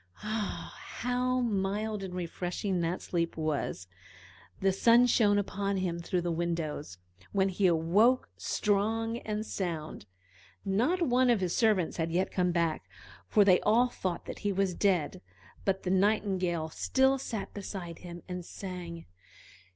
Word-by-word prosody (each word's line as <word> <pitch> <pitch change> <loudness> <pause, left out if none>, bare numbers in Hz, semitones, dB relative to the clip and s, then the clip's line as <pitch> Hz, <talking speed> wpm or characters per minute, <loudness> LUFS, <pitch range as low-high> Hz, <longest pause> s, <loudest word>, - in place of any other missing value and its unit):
Ah! 215 -1 -3
how 250 +1 -1
mild 210 -1 -1
and 185 -2 -6
refreshing 180 +1 -2
that 170 +2 -2
sleep 170 -2 -2
was! 155 - -2 0.7
The 195 0 +3
sun 235 +5 +5
shone 210 -4 +4
upon 200 0 -1
him 175 -2 -1
through 180 +1 -1
the 175 0 -1
windows, 165 - -3 0.4
when 195 -1 +3
he 190 +1 +2
awoke 185 +10 +3
strong 225 +3 0
and 215 -1 -3
sound. 160 - -4 0.6
Not 250 - +2
one 255 -3 +3
of 235 -3 +4
his 180 -2 -1
servants 210 -7 +2
had 165 -1 -1
yet 185 +3 0
come 180 -1 +1
back, 165 - -1 0.4
for 205 - +4
they 185 -2 +5
all 235 +4 +4
thought 185 -7 -4
that - - -7
he 205 - 0
was 195 -1 +1
dead; 180 -2 +1 0.4
but 195 -1 0
the 180 - -1
Nightingale 190 -4 +1
still 265 - +2
sat 220 -6 -5
beside 185 -4 -6
him 175 -1 -9
and 180 -1 -5
sang. 175 -2 -7
190 Hz, 145 wpm, -30 LUFS, 175-215 Hz, 0.7 s, sun